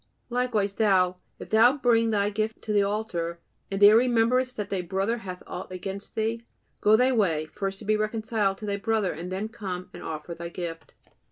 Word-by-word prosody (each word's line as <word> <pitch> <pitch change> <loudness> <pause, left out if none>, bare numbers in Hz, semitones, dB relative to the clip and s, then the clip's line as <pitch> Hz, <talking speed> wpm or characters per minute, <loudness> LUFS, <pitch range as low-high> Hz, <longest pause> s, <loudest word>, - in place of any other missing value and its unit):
"Likewise 235 -5 0
thou, 185 -4 +3 0.2
if - - -10
thou 235 +5 +6
bring 230 -3 +3
thy 205 -1 +1
gift 215 +1 -3
to 215 - -2
the 205 - +4
altar, 200 -5 -2 0.3
and 195 - -2
there 205 +1 +8
rememberest 250 +2 +3
that 210 -1 -4
thy 190 -2 0
brother 195 +6 -1
hath 185 -4 -8
aught - - -7
against 195 +2 -6
thee... 225 +1 -1 0.4
go 210 +1 +6
thy 250 +3 +4
way; 175 -10 +1
first 195 +5 -5
be 215 +1 +3
reconciled 215 -2 0
to 215 - -7
thy 200 -1 -1
brother, 215 -2 0
and 175 +4 -7
then 195 +3 -2
come 190 -5 -6
and - - -9
offer 160 +2 -5
thy 170 0 -6
gift." 170 -2 -7
205 Hz, 190 wpm, -26 LUFS, 185-225 Hz, 0.4 s, there